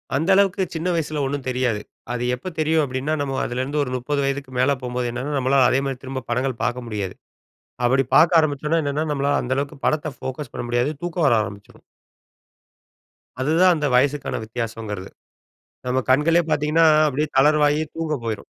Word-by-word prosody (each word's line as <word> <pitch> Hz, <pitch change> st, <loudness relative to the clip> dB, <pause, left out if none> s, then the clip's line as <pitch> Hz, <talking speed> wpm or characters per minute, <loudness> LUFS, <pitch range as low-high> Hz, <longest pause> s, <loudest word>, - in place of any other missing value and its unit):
அந்த 160 Hz, +7 st, 0 dB
அளவுக்கு, 195 Hz, -1 st, +3 dB
சின்ன 165 Hz, +2 st, -3 dB
வயசுல 155 Hz, -2 st, -2 dB
ஒண்ணும் 135 Hz, 0 st, -3 dB
தெரியாது. 125 Hz, -4 st, 0 dB, 0.3 s
அது 120 Hz, 0 st, -2 dB
எப்ப 130 Hz, +9 st, -10 dB
தெரியும், 155 Hz, 0 st, +2 dB
அப்படின்னா, 130 Hz, +4 st, -2 dB
நம்ம 135 Hz, -2 st, -2 dB
அதிலருந்து 130 Hz, +4 st, -2 dB
ஒரு 125 Hz, -, -4 dB
30 140 Hz, +3 st, -1 dB
வயதுக்கு 135 Hz, -1 st, -3 dB
மேல 140 Hz, +2 st, +3 dB
போம்போது 125 Hz, 0 st, -2 dB
என்னாகும், 135 Hz, +4 st, -3 dB
நம்மளால 130 Hz, 0 st, +4 dB
அதே 130 Hz, -, +2 dB
மாரி, 135 Hz, -2 st, -3 dB
திரும்ப 130 Hz, -1 st, -5 dB
படங்கள் 125 Hz, 0 st, -1 dB
பாக்க 125 Hz, +1 st, -1 dB
முடியாது. 100 Hz, -4 st, -4 dB, 0.7 s
அப்படி 130 Hz, +2 st, +3 dB
பாக்க 165 Hz, +1 st, +6 dB
ஆரம்பிச்சோனா 155 Hz, +2 st, 0 dB
என்னனா, 145 Hz, +2 st, -1 dB
நம்மளால 140 Hz, 0 st, 0 dB
அந்த 130 Hz, +1 st, -1 dB
அளவுக்கு 140 Hz, -1 st, -3 dB
படத்த 155 Hz, -1 st, 0 dB
ஃபோகஸ் 130 Hz, 0 st, -6 dB
பண்ண -, -, -4 dB
முடியாது. 120 Hz, +3 st, +1 dB
தூக்க 175 Hz, 0 st, -4 dB
வர 120 Hz, -, +4 dB
ஆரம்பிச்சுடும். 100 Hz, 0 st, -10 dB, 1.6 s
அதுதான் 170 Hz, +6 st, +4 dB
அந்த 150 Hz, -2 st, -2 dB
வயசுக்கான 140 Hz, +2 st, +1 dB
வித்தியாசங்கறது. 110 Hz, -4 st, -5 dB, 0.8 s
நம்ம 130 Hz, +1 st, +1 dB
கண்களே 165 Hz, +6 st, +4 dB
பாத்தீங்கன்னா, 155 Hz, +3 st, +3 dB, 0.2 s
அப்டியே 150 Hz, +2 st, -1 dB
தளர்வாகி, 150 Hz, +1 st, +4 dB
தூங்க 160 Hz, -2 st, -2 dB
போயிரும். 110 Hz, -2 st, -4 dB
135 Hz, 160 wpm, -22 LUFS, 125-150 Hz, 1.6 s, பாக்க